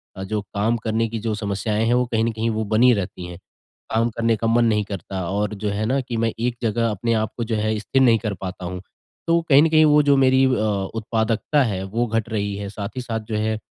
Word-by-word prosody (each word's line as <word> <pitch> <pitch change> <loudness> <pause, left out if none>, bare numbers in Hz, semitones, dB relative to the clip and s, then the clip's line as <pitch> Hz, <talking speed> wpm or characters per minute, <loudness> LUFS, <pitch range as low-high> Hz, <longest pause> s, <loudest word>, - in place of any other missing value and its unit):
अ, 95 - -6
जो 105 +2 -2
काम 105 +3 -1
करने 110 0 -1
की 115 - -4
जो 110 0 -2
समस्याएँ 105 +1 -1
हैं 120 - +3
वो 125 0 +2
कहीं 115 -2 0
न 115 - +1
कहीं 115 +1 -2
वो 110 0 -1
बनी 125 +3 +6
रहती 90 -3 -4
हैं। 90 -1 -8 0.6
काम 115 +1 +2
करने 115 0 0
का 115 +1 -2
मन 115 +1 +3
नहीं 105 -2 +2
करता 95 -1 -5
और 105 +2 -1
जो 105 +1 -3
है 105 +2 -2
ना 130 +5 +1
कि 120 -2 -5
मैं 115 0 +1
एक 120 0 -1
जगह 115 0 0
अपने 115 +3 -1
आपको 110 +1 -2
जो 110 0 -2
है 110 0 0
स्थिर 135 +5 0
नहीं 115 -3 +5
कर 110 -2 -3
पाता 90 -1 -6
हूँ। 90 +1 -5 0.5
तो 170 0 +4
कहीं 140 +1 +7
न 165 - +3
कहीं 155 0 +5
वो 150 0 +5
जो 140 -1 +4
मेरी 130 0 +4
अ, - - +3 0.5
उत्पादकता 115 +6 0
है 95 -6 -2
वो 115 +5 -1
घट 115 0 -2
रही 100 -2 -2
है। 100 -1 -5
साथ 100 0 -5
ही - - -1
साथ 115 -2 -3
जो - - 0
है 110 0 0
110 Hz, 255 wpm, -22 LUFS, 105-120 Hz, 0.6 s, कहीं